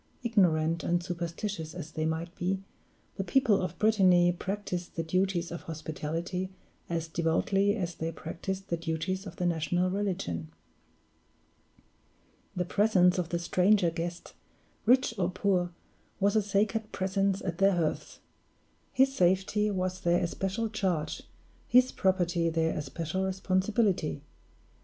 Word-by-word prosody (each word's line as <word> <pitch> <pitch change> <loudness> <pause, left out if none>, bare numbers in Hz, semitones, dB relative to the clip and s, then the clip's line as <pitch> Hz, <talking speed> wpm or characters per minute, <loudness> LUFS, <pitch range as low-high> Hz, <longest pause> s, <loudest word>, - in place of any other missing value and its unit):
Ignorant 170 -8 +2
and 175 0 +1
superstitious 170 -1 -4
as 160 -3 -7
they 155 0 -1
might 165 +2 -3
be, 190 +2 -2 0.5
the 195 - -1
people 220 +1 +3
of 180 -1 -4
Brittany 185 -5 +5
practiced 180 -1 -4
the 165 - -1
duties 185 0 0
of 170 - -5
hospitality 165 +3 -4 0.4
as 165 -1 -2
devoutly 185 +5 +1
as 175 -5 -3
they 165 0 -3
practiced 190 +4 -5
the 170 - 0
duties 170 +4 -3
of 180 - -8
the 180 - -2
national 175 +2 +1
religion. 175 - -2 2.1
The 180 - -1
presence 185 -2 +3
of 170 -2 -2
the 170 - 0
stranger 180 +1 +3
guest, 170 +1 -5 0.5
rich 255 0 +4
or 175 -1 +2
poor, 185 -1 +1 0.5
was 200 +2 +2
a 215 - +5
sacred 210 +2 0
presence 195 +1 0
at 175 -2 -3
their 195 0 +5
hearths. 165 -3 -2 0.7
His 270 +1 +3
safety 190 +1 +2
was 185 -2 -2
their 175 0 +2
especial 195 +5 -2
charge, 190 -7 -1 0.5
his 250 +1 +5
property 175 -3 +1
their 160 0 0
especial 160 +5 -3
responsibility. 190 -4 0
180 Hz, 130 wpm, -29 LUFS, 170-195 Hz, 2.1 s, Brittany